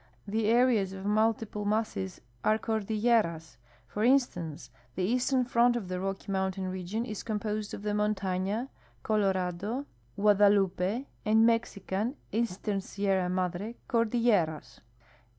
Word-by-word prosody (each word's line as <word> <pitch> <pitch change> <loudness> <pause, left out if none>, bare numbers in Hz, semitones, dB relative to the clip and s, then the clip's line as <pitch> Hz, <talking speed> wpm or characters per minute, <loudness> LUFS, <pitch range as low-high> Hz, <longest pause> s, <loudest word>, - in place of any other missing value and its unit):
The 215 +1 0
areas 230 -5 +3
of 190 0 -7
multiple 215 0 +1
masses 205 - -2 0.2
are 215 - +3
cordilleras. 215 - 0 0.3
For 205 - -3
instance, 225 - +1 0.2
the 185 - -1
eastern 250 +5 +2
front 240 0 +3
of 210 -7 -4
the 180 0 -2
Rocky 195 +1 -4
mountain 190 0 -1
region 190 +5 -3
is 215 -4 -5
composed 210 -1 -3
of - - -10
the 210 - -1
IMontaiia, 205 +2 -1 0.3
Colo 210 -3 +2
rado, 190 +8 -3 0.3
Guadalupe, 200 +2 +3 0.2
and 220 +1 +4
Mexican 230 0 0 0.2
(eastern 205 -2 -1
Sierra 195 -3 0
Madre) 185 +4 -2
cordilleras. 225 -9 +1
210 Hz, 120 wpm, -29 LUFS, 190-225 Hz, 0.3 s, and